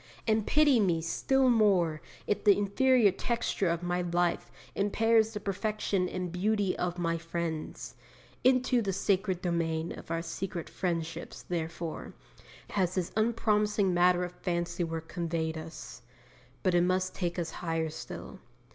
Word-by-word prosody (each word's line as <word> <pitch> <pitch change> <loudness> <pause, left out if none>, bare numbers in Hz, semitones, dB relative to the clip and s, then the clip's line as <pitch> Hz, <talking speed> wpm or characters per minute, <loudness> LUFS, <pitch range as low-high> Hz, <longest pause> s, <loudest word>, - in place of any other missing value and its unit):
And 220 -2 +1
pity 290 -4 +5
me 175 -6 +2
still 265 +11 +1
more 195 -9 +3 0.2
if 205 - -1
the 205 -2 +6
inferior 220 +2 +4
texture 230 -4 -1
of 170 +1 -1
my 175 0 0
life 175 0 0 0.2
impairs 220 +2 +3
the - - -2
perfection 200 -2 -1
and 180 -2 -4
beauty 200 +1 +1
of 180 0 -2
my 165 -1 0
friend's! 165 -1 -4 0.5
Into 255 -1 +4
the 195 -3 -1
sacred 190 -1 0
domain 165 -2 -1
of - - -9
our 165 0 -1
sweetest 175 +1 -5
friendships, 170 -3 -3
therefore, 165 -1 -4 0.6
has 185 -3 0
this 180 -3 -1
unpromising 210 -3 +2
matter 180 0 +4
of 175 - -4
fancy 175 -1 -1
work 165 -1 -4
conveyed 165 -2 -2
us. 160 -5 -8 0.6
But 185 - +2
it 175 - +4
must 185 +1 +1
take 175 -2 -2
us 170 -2 -2
higher 165 -2 -1
still. 160 - -8
180 Hz, 145 wpm, -30 LUFS, 170-210 Hz, 0.6 s, the